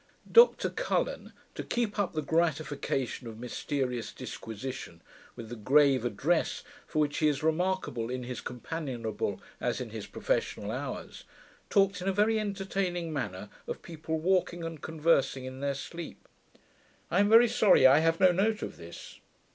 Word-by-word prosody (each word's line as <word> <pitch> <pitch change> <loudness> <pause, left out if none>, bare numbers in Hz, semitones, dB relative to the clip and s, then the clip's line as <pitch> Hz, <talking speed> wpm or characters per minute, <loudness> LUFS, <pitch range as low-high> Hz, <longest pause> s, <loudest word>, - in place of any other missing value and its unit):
Dr 470 +1 +6
Cullen, - - -2 0.2
to - - -5
keep 225 -3 -2
up 200 - 0
the 155 -1 -2
gratification 150 -6 -1
of 110 -1 -8
mysterious 125 0 -3
disquisition, 115 -6 -7 0.3
with 115 -2 -8
the 120 - -5
grave 135 +3 +4
address 125 +9 0 0.2
for - - -6
which 150 -1 +1
he 155 - +4
is 145 0 0
remarkable 160 -8 0
in 125 0 -3
his 125 0 -5
companionable 125 -4 -4 0.2
as - - -1
in - - -6
his - - -6
professional - - -2
hours, - - -6 0.4
talked, 195 -2 +3
in 185 - -4
a - - +3
very 215 +3 +3
entertaining 195 -4 -2
manner, 105 -8 -4 0.2
of - - -5
people 160 -1 -4
walking 175 0 +1
and 165 -2 -6
conversing 150 -5 +1
in 130 0 -7
their 140 0 -1
sleep. 170 +4 -8 0.8
I 175 - +3
am 205 0 +4
very 230 +2 +8
sorry 220 - +5
I 135 +3 +8
have 165 +1 +2
no 185 -1 +6
note 210 +4 +1
of - - -6
this. 85 +1 -11
155 Hz, 155 wpm, -30 LUFS, 130-185 Hz, 0.8 s, very